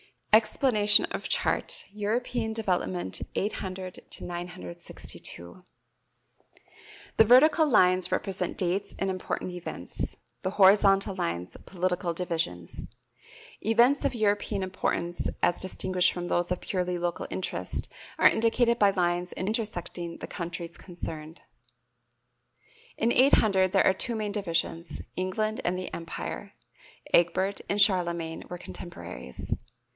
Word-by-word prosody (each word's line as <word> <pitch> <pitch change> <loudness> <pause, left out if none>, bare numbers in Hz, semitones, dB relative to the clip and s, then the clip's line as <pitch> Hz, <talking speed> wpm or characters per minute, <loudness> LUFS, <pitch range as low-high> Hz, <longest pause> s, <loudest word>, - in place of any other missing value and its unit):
[Illustration: 215 0 +7
EXPLANATION 210 -6 +4
OF - - -4
CHART: - - +3
EUROPEAN 220 +2 -1
DEVELOPMENT, 95 - -1
800 190 -3 -3
TO - - -2
962. 175 - -7 1.6
The 220 - +7
vertical 305 +7 +6
lines 185 -7 +4
represent 185 -2 -2
dates 190 +2 -1
and 195 0 0
important 185 0 -4
events; 180 -1 -5 0.3
the 185 - -2
horizontal 195 0 +5
lines, 85 - -3
political 180 -1 -1
divisions. 160 - -3 0.7
Events 240 +6 +3
of 265 -3 0
European 205 -2 0
importance 175 -2 -2
as 175 - +3
distinguished 185 -1 +1
from 175 0 -5
those 175 0 +1
of 180 - -1
purely 180 -2 -2
local 175 0 -2
interest 90 - -4 0.3
are - - +7
indicated 235 +1 +2
by 205 -1 +5
lines 175 -1 0
intersecting 185 -5 -3
the - - -7
countries 170 0 -6
concerned. 160 -3 -8 1.6
In 230 +2 +2
800 205 -9 +4
there 195 - +4
are 190 - +5
two 235 +5 +2
main 215 -2 -2
divisions, 170 -4 -2
England 215 +4 -1
and 180 +1 +1
the 185 - -5
Empire. 165 -1 -6 0.6
(Egbert 185 +3 +3
and 205 - 0
Charlemagne 170 -5 +2
were 180 - -5
contemporaries.) 90 - -6
185 Hz, 115 wpm, -28 LUFS, 175-210 Hz, 1.6 s, Illustration